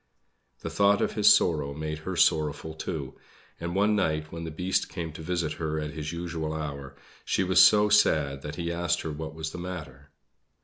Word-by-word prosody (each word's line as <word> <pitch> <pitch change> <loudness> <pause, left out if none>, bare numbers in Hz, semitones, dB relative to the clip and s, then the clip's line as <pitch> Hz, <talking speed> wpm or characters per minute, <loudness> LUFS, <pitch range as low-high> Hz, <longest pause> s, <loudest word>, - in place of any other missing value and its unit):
The - - -5
thought 100 0 +3
of - - 0
his - - +6
sorrow 75 -4 +2
made 75 0 -4
her 95 +4 -5
sorrowful 80 -1 +1
too; 75 -3 -6 0.4
and 85 +1 -4
one 105 +2 +3
night, 80 -5 -1
when 85 0 -6
the - - -4
Beast 90 +4 -1
came 80 -4 -5
to 80 - -9
visit 85 -1 -2
her 80 -1 -1
at 75 0 -4
his 75 0 -5
usual 85 -2 -4
hour, 70 -3 -6 0.3
she - - 0
was 90 0 +5
so 105 +2 +7
sad 75 -9 +3
that 75 +1 -6
he 85 -1 -3
asked 85 -2 0
her 80 - -4
what 80 +1 -6
was 80 0 -4
the 85 - -7
matter. 75 -6 -8
80 Hz, 195 wpm, -27 LUFS, 75-90 Hz, 0.4 s, so